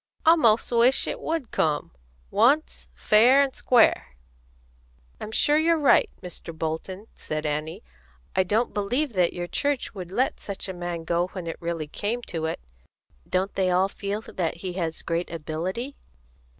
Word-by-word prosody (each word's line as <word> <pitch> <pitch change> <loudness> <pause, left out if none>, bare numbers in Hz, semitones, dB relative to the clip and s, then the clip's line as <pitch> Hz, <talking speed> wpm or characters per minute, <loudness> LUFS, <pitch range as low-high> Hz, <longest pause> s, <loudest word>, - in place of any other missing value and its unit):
I 325 +1 +8
'most 230 -8 +3
wish 240 +3 +4
it - - -4
would 320 -6 -3
come, 150 -2 0 0.4
once, 270 +9 +2
fair 245 +6 +5
and 270 -2 -3
square." 230 - +3 1.0
"I'm - - -6
sure 295 +6 +3
you're 330 +1 +3
right, 295 -3 +4
Mr. 170 -2 -8
Bolton," 165 +6 -4
said 155 0 -5
Annie. 150 - -3 0.5
"I - - +4
don't 210 +6 0
believe 240 +7 -1
that 180 -3 +2
your 175 0 -4
church 285 +8 -2
would 185 -3 -8
let 255 +7 0
such 200 -1 -6
a 190 - -4
man 175 -2 -5
go 170 +2 0
when 185 -3 -6
it 165 - -5
really 170 -2 -3
came 220 +9 -3
to 160 -6 -4
it. 160 - -2 0.7
Don't 190 +2 0
they 190 -1 +1
all 185 +2 +3
feel 200 +1 -4
that 175 -6 -3
he 180 +1 -5
has 165 -3 -3
great 170 +1 -2
ability?" 170 - -4
190 Hz, 165 wpm, -25 LUFS, 170-240 Hz, 1.0 s, I